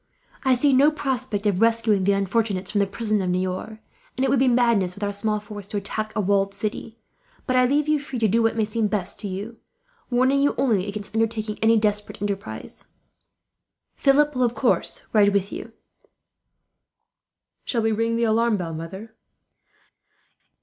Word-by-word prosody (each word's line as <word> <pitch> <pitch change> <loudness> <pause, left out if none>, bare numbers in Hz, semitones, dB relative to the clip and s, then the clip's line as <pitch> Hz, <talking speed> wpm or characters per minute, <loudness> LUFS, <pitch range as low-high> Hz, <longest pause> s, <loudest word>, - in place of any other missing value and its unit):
I 260 -2 +4
see 275 +3 +3
no 275 +3 +6
prospect 260 -8 -2
of 200 -1 +1
rescuing 225 -4 +3
the 200 - +4
unfortunates 195 -1 -1
from 205 - +1
the 200 - +2
prison 210 +1 -1
at 185 - -1
Niort; 185 +4 -2 0.4
and 260 - 0
it 265 - +1
would 275 - +3
be 265 - +3
madness, 235 -7 +2
with 205 - -7
our 205 0 -1
small 210 +1 -1
force, 205 -1 -10
to 205 - -4
attack 215 +2 -3
a - - 0
walled 195 0 +1
city; 220 +1 -4 0.5
but 255 - 0
I 255 0 +5
leave 290 +3 +1
you 305 -1 +2
free 275 -2 -6
to 225 -2 +2
do 225 +4 +2
what 225 0 +1
may 220 - +2
seem 215 0 -1
best 200 -4 -2
to 210 - -5
you, 205 +5 -6 0.5
warning 260 +3 +2
you 285 - +2
only 210 -8 +1
against 205 0 -6
undertaking 220 -1 -1
any 225 +1 +4
desperate 210 -1 -1
enterprise. 200 0 -5 1.1
"Philip 295 +2 +3
will, 255 - -2
of 240 -1 +1
course, 245 +1 0
ride 205 -2 +5
with 200 +1 0
you." - - -7 1.9
"Shall 230 -3 -1
we 225 - +2
ring 230 +1 0
the 235 - 0
alarm 225 0 +2
bell, 170 -3 -4
mother?" 190 +8 -8
220 Hz, 180 wpm, -23 LUFS, 200-240 Hz, 1.9 s, no